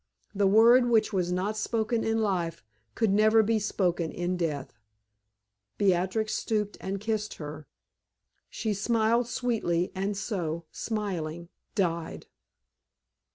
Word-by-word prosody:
The 200 -1 +2
word 235 +5 +6
which 220 -2 +3
was 180 -2 0
not 190 +4 -1
spoken 225 +1 -1
in 225 0 +1
life 175 -5 -1 0.3
could 225 -4 +2
never 215 +2 +5
be 220 +1 +1
spoken 175 -5 0
in 175 +1 -2
death. 155 -6 -3 1.0
Beatrix 195 +3 +1
stooped 210 -2 -1
and 195 +1 -3
kissed 215 0 -2
her. 150 -1 -8 0.8
She 220 -2 -2
smiled 230 +3 +1
sweetly 215 -9 -1
and 195 +1 -2
so, 170 -5 -3
smiling, 175 -6 -4 0.3
died. 170 -4 -1
200 Hz, 115 wpm, -28 LUFS, 175-220 Hz, 1.0 s, word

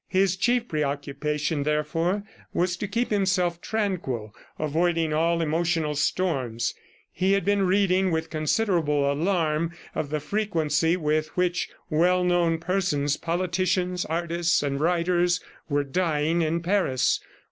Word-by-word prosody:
His 190 -1 +2
chief 240 +4 +1
preoccupation, 150 +1 -2
therefore, 155 +6 0 0.3
was 180 0 +1
to 205 - -3
keep 230 +4 -1
himself 185 -4 +1
tranquil, 170 - -2 0.2
avoiding 160 +1 +1
all 165 +2 +2
emotional 165 -1 0
storms. 140 -7 -1 0.4
He 185 +3 +1
had 200 -3 +1
been 200 -1 +2
reading 190 0 +3
with 160 -1 -2
considerable 155 -3 +1
alarm 165 0 0 0.2
of 145 - -3
the 150 +1 -1
frequency 165 -2 0
with 155 -1 0
which 175 -2 0 0.2
well 180 +4 +3
known 175 -2 +2
persons, 165 -5 0
politicians, 180 +1 0
artists 170 0 0
and 140 -1 -1
writers, 175 +2 +2 0.3
were 145 -1 +1
dying 160 +1 0
in 165 +1 0
Paris. 175 -9 +2
170 Hz, 125 wpm, -25 LUFS, 150-185 Hz, 0.4 s, reading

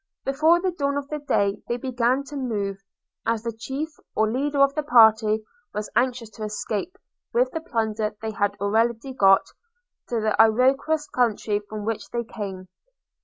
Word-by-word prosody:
Before 310 +5 +4
the 370 +1 0
dawn 280 -4 -1
of 285 -1 -4
the 300 - -3
day 200 -8 0
they 240 - -1
began 250 +1 0
to 290 +1 -10
move; 205 -7 -2 0.4
as 230 -1 -1
the 230 - -2
chief, 270 +7 -4 0.3
or 220 0 +2
leader 285 +4 -1
of 275 0 +5
the 305 - -1
party, 220 -5 +5 0.3
was 210 0 -4
anxious 240 -2 0
to 215 - -8
escape, 215 - -3 0.4
with 250 +2 +2
the 320 - -4
plunder 220 -8 -2
they 220 0 -4
had 205 -1 0
already 225 +5 0
got, 195 -5 +5 0.6
to 235 - 0
the 215 -1 +1
Iroquois 265 +7 +3
country, 220 -4 +1
from 215 -1 -5
which 225 -1 -3
they 235 0 -2
came. 195 -5 -7
235 Hz, 170 wpm, -24 LUFS, 215-275 Hz, 0.6 s, of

